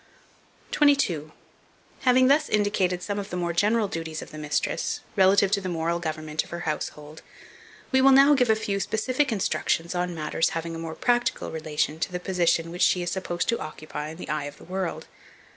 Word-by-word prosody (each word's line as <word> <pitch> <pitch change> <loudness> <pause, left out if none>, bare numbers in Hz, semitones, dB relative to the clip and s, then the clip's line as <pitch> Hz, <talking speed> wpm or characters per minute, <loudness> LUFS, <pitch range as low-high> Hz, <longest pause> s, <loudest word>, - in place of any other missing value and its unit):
22. 215 - +2 0.7
HAVING 255 0 +4
THUS 290 +3 +3
INDICATED 195 -4 +1
some 205 0 -3
of 200 0 -6
the 180 - -4
more 175 -1 -1
general 210 +5 +2
duties 165 -3 -5
of - - -13
the 155 - -8
mistress, 150 0 -1
relative 195 0 +4
to 200 -1 +2
the 185 - -4
moral 170 0 -1
government 155 -2 -3
of - - -16
her 170 0 -5
household, 150 -1 -5 0.7
we 265 0 +4
will 270 - +7
now 275 +2 +7
give 250 -4 +2
a 220 - +5
few 200 -2 -2
specific 255 +7 0
instructions 175 -4 0
on 180 -1 -2
matters 155 +1 0
having 165 0 -4
a - - -6
more 165 -1 -5
practical 240 0 0
relation 155 -1 -2
to 170 - -2
the 180 - -3
position 175 -3 +1
which 175 - -6
she 180 - +3
is 175 - -2
supposed 180 -2 -2
to 235 - +1
occupy 155 -1 -6
in 160 - -9
the - - -8
eye 150 -1 -1
of 145 0 -8
the - - -15
world. 185 0 -4
180 Hz, 195 wpm, -26 LUFS, 160-210 Hz, 0.7 s, will